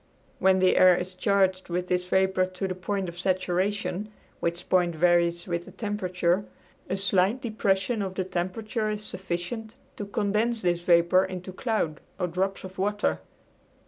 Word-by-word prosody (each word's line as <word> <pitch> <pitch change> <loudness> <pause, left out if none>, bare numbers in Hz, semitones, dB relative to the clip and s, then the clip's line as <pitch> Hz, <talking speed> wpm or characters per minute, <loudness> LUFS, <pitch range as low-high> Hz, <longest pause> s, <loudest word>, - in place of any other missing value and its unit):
When 190 0 +4
the 185 0 +3
air 185 -1 +7
is 180 +1 -4
charged 190 -1 +1
with 180 +1 -1
this 180 0 0
vapor 190 0 +2
to 185 +1 -4
the 185 - -2
point 190 +1 -3
of 170 0 -8
saturation 190 +2 -1 0.3
(which 170 +1 -3
point 175 -2 +2
varies 175 +1 +3
with 170 -1 -3
the - - -11
temperature) 185 -3 0 0.5
a 190 - 0
slight 195 +4 +2
depression 215 -1 0
of 190 -1 -3
the 185 - 0
temperature 215 +5 -2
is 210 0 -3
sufficient 190 +5 -5 0.2
to 205 - -5
condense 215 +2 0
this 175 -1 +1
vapor 175 +1 +4
into 185 0 -7
cloud 210 -9 -1 0.2
or 180 - +1
drops 185 +3 -2
of 190 0 -9
water. 195 - 0
185 Hz, 160 wpm, -27 LUFS, 180-200 Hz, 0.5 s, air